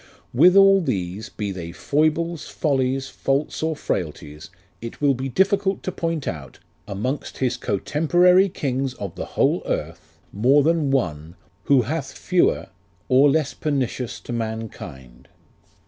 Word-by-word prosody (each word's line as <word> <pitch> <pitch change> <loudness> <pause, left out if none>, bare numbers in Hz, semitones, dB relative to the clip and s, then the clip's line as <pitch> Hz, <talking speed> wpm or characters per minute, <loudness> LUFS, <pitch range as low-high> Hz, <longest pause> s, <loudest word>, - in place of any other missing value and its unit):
With 175 +9 +6
all 195 0 +7
these, 95 - -3
Be 105 -2 -4
they 85 -3 -6
foibles, 155 - 0
follies, 135 -2 0
faults, 135 +2 -2
or 160 0 0
frailties, 75 - -5 0.3
It 115 0 -8
will 145 -2 +3
be 130 +1 -4
difficult 195 +5 +1
to 185 - -2
point 165 -4 -3
out, 75 -5 -6 0.3
Amongst 125 +9 -4
his 130 -2 0
cotemporary 175 - +3
Kings 135 -4 -2
of 100 -7 -6
the - - -5
whole - - +3
earth, 80 +1 -5 0.2
More 130 +8 +4
than 160 -2 +2
ONE 85 - -1 0.3
Who 135 -3 +4
hath 140 +2 -4
fewer, 180 - +1 0.4
or 135 +3 +6
less 140 -2 +1
pernicious 130 -4 -2
to 120 - -7
mankind. 110 - -6
135 Hz, 135 wpm, -22 LUFS, 105-160 Hz, 0.4 s, all